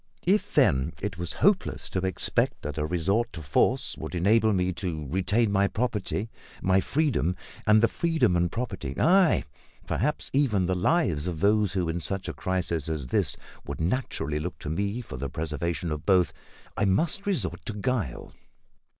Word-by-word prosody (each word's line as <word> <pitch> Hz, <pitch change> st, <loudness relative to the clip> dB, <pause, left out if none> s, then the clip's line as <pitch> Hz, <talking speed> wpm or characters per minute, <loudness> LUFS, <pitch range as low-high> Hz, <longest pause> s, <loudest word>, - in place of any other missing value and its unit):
If, 200 Hz, +4 st, +1 dB
then, 65 Hz, +4 st, +3 dB
it 100 Hz, -3 st, -4 dB
was 85 Hz, -1 st, -3 dB
hopeless 200 Hz, -1 st, +2 dB
to 95 Hz, -, 0 dB
expect 95 Hz, 0 st, 0 dB
that 75 Hz, +1 st, -4 dB
a 75 Hz, -, 0 dB
resort 95 Hz, +8 st, 0 dB
to 80 Hz, -, -7 dB
force 70 Hz, -, +1 dB
would -, -, -5 dB
enable 110 Hz, +5 st, +4 dB
me 90 Hz, -2 st, +1 dB
to 80 Hz, -5 st, -4 dB
retain 95 Hz, -, +1 dB
my 100 Hz, 0 st, +3 dB
property, 110 Hz, -1 st, -2 dB, 0.3 s
my 95 Hz, +1 st, +3 dB
freedom, 130 Hz, -, +1 dB, 0.3 s
and 110 Hz, +1 st, +6 dB
the -, -, +7 dB
freedom 165 Hz, -, +1 dB
and 85 Hz, 0 st, +1 dB
property, 95 Hz, -, -4 dB
ay, 185 Hz, -1 st, +4 dB, 0.4 s
perhaps 150 Hz, +7 st, -1 dB
even 120 Hz, -9 st, +2 dB
the 95 Hz, -, +1 dB
lives 90 Hz, -, +1 dB
of 85 Hz, -3 st, -3 dB
those 105 Hz, +1 st, +3 dB
who, 90 Hz, -3 st, 0 dB
in 80 Hz, +1 st, -1 dB
such 95 Hz, +3 st, -4 dB
a -, -, -3 dB
crisis 85 Hz, -4 st, -2 dB
as 75 Hz, -4 st, -2 dB
this, -, -, +1 dB, 0.3 s
would -, -, -5 dB
naturally 80 Hz, -, -1 dB
look 85 Hz, +1 st, -4 dB
to 75 Hz, -, -6 dB
me 100 Hz, +7 st, -1 dB
for 85 Hz, -, -8 dB
the 70 Hz, +2 st, -4 dB
preservation 80 Hz, +3 st, -3 dB
of 75 Hz, -1 st, -3 dB
both, 90 Hz, -5 st, +3 dB, 0.4 s
I 100 Hz, -, +1 dB
must 165 Hz, -, +1 dB
resort 195 Hz, -4 st, -1 dB
to 110 Hz, -, -2 dB
guile. 105 Hz, -, -2 dB
95 Hz, 175 wpm, -27 LUFS, 85-115 Hz, 0.4 s, the